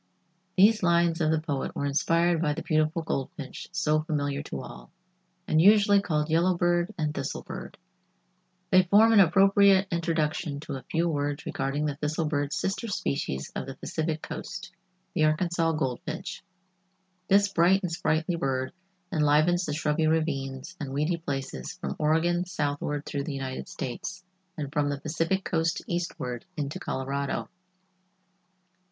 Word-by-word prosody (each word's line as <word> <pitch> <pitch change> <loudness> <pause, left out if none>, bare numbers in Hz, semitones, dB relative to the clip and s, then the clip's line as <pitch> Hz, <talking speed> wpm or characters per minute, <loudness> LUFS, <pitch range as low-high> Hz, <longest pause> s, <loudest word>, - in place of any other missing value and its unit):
These 215 +3 +6
lines 170 -1 +3
of 155 - +3
the 160 0 +2
poet 145 -4 -3
were 140 - -1
inspired 165 +4 +2
by 150 -3 +1
the 165 - -5
beautiful 155 +2 +1
goldfinch 135 -2 -4
so 155 -4 +1
familiar 145 -3 -2
to 70 - -6
all, - - -10 0.6
and 155 - +4
usually 205 +1 +6
called 150 -5 0
yellow 170 +3 +2
bird 175 +1 +2
and 155 -2 -1
thistle - - -4
bird. - - -8 0.9
They 185 - +7
form 210 +5 +5
an 215 - +7
appropriate 195 +2 +5
introduction 160 -3 -1
to 155 -1 -6
a 135 - -5
few 170 +1 +1
words 145 -2 -2
regarding 135 +3 -1
the 145 -2 -2
thistle 155 +2 -1
bird's 145 -1 -1
sister 195 +5 -2
species 70 - -2
of - - -4
the - - -6
Pacific 160 -1 -3
coast—the 155 - -6
Arkansas 165 +1 +2
Goldfinch. 155 0 -3 0.9
This 200 0 +4
bright 185 +4 +4
and 180 - -2
sprightly 160 +1 0
bird 130 -1 -1 0.4
enlivens 155 +4 +3
the 150 - -1
shrubby 155 +1 +1
ravines 140 -4 -1
and 135 -2 -5
weedy 150 +5 0
places 135 - -4
from 70 - -4
Oregon 165 +3 +2
southward 145 -3 -2
through 140 -1 -3
the 150 -3 -4
United 130 -1 -5
States, 180 +9 -5 0.3
and 145 -2 -5
from 145 -2 +1
the 140 -1 -2
Pacific 165 +6 -1
coast 165 -1 0
eastward 130 -9 -3
into 145 -1 -3
Colorado. 140 +1 -3
155 Hz, 145 wpm, -27 LUFS, 145-175 Hz, 0.9 s, They